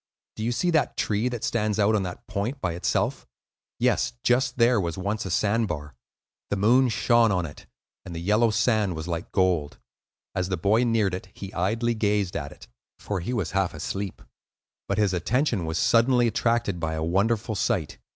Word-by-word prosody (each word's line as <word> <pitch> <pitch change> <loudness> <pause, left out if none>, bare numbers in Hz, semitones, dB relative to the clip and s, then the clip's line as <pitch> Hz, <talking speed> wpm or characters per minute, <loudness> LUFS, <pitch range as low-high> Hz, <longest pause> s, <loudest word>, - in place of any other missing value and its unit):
Do 110 - -5
you 120 - 0
see 175 +9 0
that 160 -3 +1
tree 110 +4 0
that 120 -2 -5
stands 110 -3 0
out 105 +1 +3
on 105 - +2
that 90 -2 -6
point 105 +7 -3
by 90 - -2
itself? 85 +1 -1 0.5
Yes; - - +1
just 125 +1 +2
there 115 -2 +4
was 85 -3 -3
once 100 +2 -2
a - - -4
sand 105 +5 +1
bar. 75 -4 -5 0.6
The - - 0
moon 120 +6 +4
shone 115 0 +3
on 90 -3 0
it, 75 - -11 0.4
and 85 - -8
the - - -4
yellow 105 +6 +3
sand 105 -3 +1
was 80 +1 -5
like 85 -1 -4
gold, 90 -6 +1 0.6
as 90 -1 -1
the 95 - -1
boy 105 +8 +2
neared 110 -5 +1
it; 95 +1 -6
he 100 +1 -8
idly 115 +6 0
gazed 105 -4 0
at 70 -1 -4
it, - - -14 0.3
for 100 -2 -3
he 90 +8 -4
was 105 -10 -2
half 95 -2 0
asleep; 100 -2 -5 0.6
but - - -1
his 105 -3 +2
attention 110 - 0
was 80 +1 -2
suddenly 120 +4 +4
attracted 115 -4 0
by 80 -1 -2
a 80 - -2
wonderful 105 +6 +1
sight. 100 -6 -1
105 Hz, 190 wpm, -25 LUFS, 90-115 Hz, 0.6 s, there